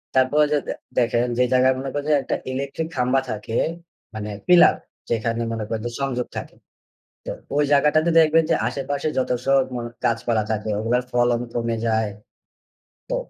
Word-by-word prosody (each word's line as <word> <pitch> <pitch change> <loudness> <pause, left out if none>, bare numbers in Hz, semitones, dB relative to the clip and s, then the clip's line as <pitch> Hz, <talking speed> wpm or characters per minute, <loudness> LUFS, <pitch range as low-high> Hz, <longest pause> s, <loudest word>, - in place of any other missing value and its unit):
তারপর 130 +3 +4
যে 150 - +3
দে - - -1 0.3
দেখেন 120 0 +2
যে, 125 - +4
জায়গায় 130 +1 +4
মনে 135 - -4
করেন 145 0 -3
যে - - +6
একটা - - -1 0.2
ইলেকট্রিক 140 +4 -3
খাম্বা 125 +1 +2
থাকে 110 +2 -4 0.6
মানে 105 -1 -5 0.2
পিলার 180 0 +7 0.3
যেখানে 115 0 -1
মনে 115 -1 -3
করেন 110 -1 -2
যে - - -5
সংযোগ 125 -3 -1
থাকে। - - -7 0.7
তো - - -5 0.3
ওই 150 - +4
জায়গাটাতে 150 +3 +3
দেখবেন 160 0 +5
যে - - +5
আশেপাশে 140 +3 -3
যত 130 - -1 0.2
সব 135 0 +4
মন 120 -1 -3 0.2
গাছপালা 115 -1 +1
থাকে, 110 0 -2
ওগুলোর 120 +3 +1
ফলন 120 -1 +2
কমে 115 -1 -1
যায়। 110 -2 +1 1.0
তো - - 0
125 Hz, 165 wpm, -22 LUFS, 115-140 Hz, 1.0 s, পিলার